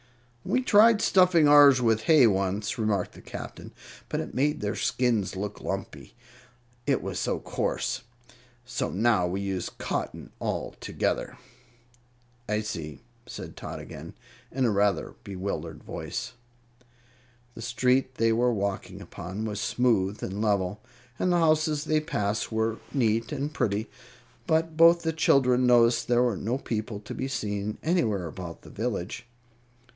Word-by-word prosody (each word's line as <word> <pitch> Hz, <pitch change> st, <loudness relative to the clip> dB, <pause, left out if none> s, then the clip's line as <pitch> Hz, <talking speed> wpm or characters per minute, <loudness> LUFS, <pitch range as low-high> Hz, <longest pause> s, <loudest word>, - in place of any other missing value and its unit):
"We 255 Hz, -, 0 dB
tried 220 Hz, -1 st, +6 dB
stuffing 180 Hz, -5 st, +5 dB
ours 145 Hz, -2 st, +8 dB
with 115 Hz, -2 st, +2 dB
hay 155 Hz, -3 st, +6 dB
once," 100 Hz, +1 st, 0 dB
remarked 105 Hz, -4 st, 0 dB
the -, -, -14 dB
Captain; -, -, -8 dB, 0.4 s
"but -, -, -1 dB
it -, -, -5 dB
made 145 Hz, +3 st, +1 dB
their 105 Hz, 0 st, -2 dB
skins 115 Hz, -6 st, 0 dB
look 100 Hz, +1 st, -5 dB
lumpy, -, -, -5 dB, 0.7 s
it -, -, +1 dB
was -, -, -3 dB
so -, -, 0 dB
coarse; 130 Hz, +2 st, -2 dB, 0.6 s
so 125 Hz, -1 st, -2 dB
now 105 Hz, -2 st, +2 dB
we 95 Hz, +3 st, -2 dB
use 95 Hz, -2 st, -3 dB
cotton -, -, -5 dB
altogether." -, -, -2 dB, 1.1 s
"I 105 Hz, 0 st, +1 dB
see," 80 Hz, -8 st, -6 dB, 0.3 s
said -, -, -8 dB
Tot -, -, -7 dB
again, -, -, -10 dB, 0.4 s
in 130 Hz, -1 st, 0 dB
a 115 Hz, -, +3 dB
rather 100 Hz, -3 st, +1 dB
bewildered 90 Hz, -4 st, -5 dB
voice. 130 Hz, -, -5 dB, 1.2 s
The 115 Hz, -, -9 dB
street 130 Hz, +3 st, +1 dB
they 115 Hz, -1 st, +2 dB
were 120 Hz, +2 st, +2 dB
walking 100 Hz, -3 st, -3 dB
upon 95 Hz, +5 st, -6 dB
was 105 Hz, -1 st, -3 dB
smooth 110 Hz, -6 st, +1 dB
and 100 Hz, +2 st, -3 dB
level, 100 Hz, -2 st, 0 dB, 0.4 s
and 185 Hz, -, +2 dB
the 175 Hz, -, +3 dB
houses 155 Hz, -2 st, +2 dB
they 155 Hz, 0 st, +2 dB
passed 105 Hz, -9 st, -2 dB
were 110 Hz, 0 st, 0 dB
neat 115 Hz, -4 st, +1 dB
and 145 Hz, +1 st, -3 dB
pretty; 110 Hz, -4 st, -1 dB, 0.6 s
but 160 Hz, -1 st, +1 dB
both 170 Hz, +1 st, +6 dB
the 160 Hz, 0 st, 0 dB
children 130 Hz, -5 st, +3 dB
noticed 120 Hz, -1 st, +4 dB
there 120 Hz, 0 st, +3 dB
were 120 Hz, -4 st, +1 dB
no 115 Hz, +7 st, -2 dB
people 110 Hz, -5 st, -4 dB
to 105 Hz, -, -8 dB
be 130 Hz, -, -3 dB
seen 105 Hz, -5 st, -3 dB
anywhere 115 Hz, -, +1 dB
about 85 Hz, 0 st, -8 dB
the -, -, -13 dB
village. 115 Hz, +1 st, -4 dB
115 Hz, 145 wpm, -27 LUFS, 100-135 Hz, 1.2 s, ours